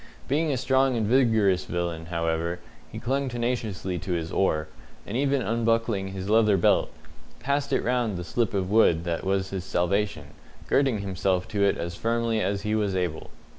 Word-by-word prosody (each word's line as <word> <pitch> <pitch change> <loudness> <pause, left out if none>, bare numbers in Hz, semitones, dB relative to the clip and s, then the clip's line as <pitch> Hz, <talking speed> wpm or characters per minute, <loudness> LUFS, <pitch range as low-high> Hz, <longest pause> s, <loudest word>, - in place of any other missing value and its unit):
Being 155 +3 +1
a 135 - 0
strong 130 0 +2
and 110 - 0
vigorous 110 -6 +3
villain, 85 -2 -3
however, 85 0 -1 0.3
he - - -7
clung 135 +2 -1
tenaciously 115 -7 -2
to 90 +3 -3
his 85 -1 -3
oar, 80 -5 +1 0.4
and 100 - -6
even 135 0 +1
unbuckling 115 -3 0
his 95 0 -6
leather 105 -2 +4
belt, 85 - +3 0.5
passed 140 +3 -1
it - - +1
round 120 -5 0
the 90 - -4
slip 110 +3 -1
of 95 -1 -1
wood 85 -7 +4
that 85 -1 -2
was 95 0 -1
his 95 -2 -3
salvation, 90 -5 -1 0.3
girding 135 -7 +2
himself 95 -1 -1
to 105 -3 0
it 100 - +3
as 85 0 -4
firmly 115 0 0
as 100 -1 -1
he 105 0 -1
was 105 -3 0
able. 90 -4 -2
100 Hz, 175 wpm, -26 LUFS, 90-115 Hz, 0.5 s, leather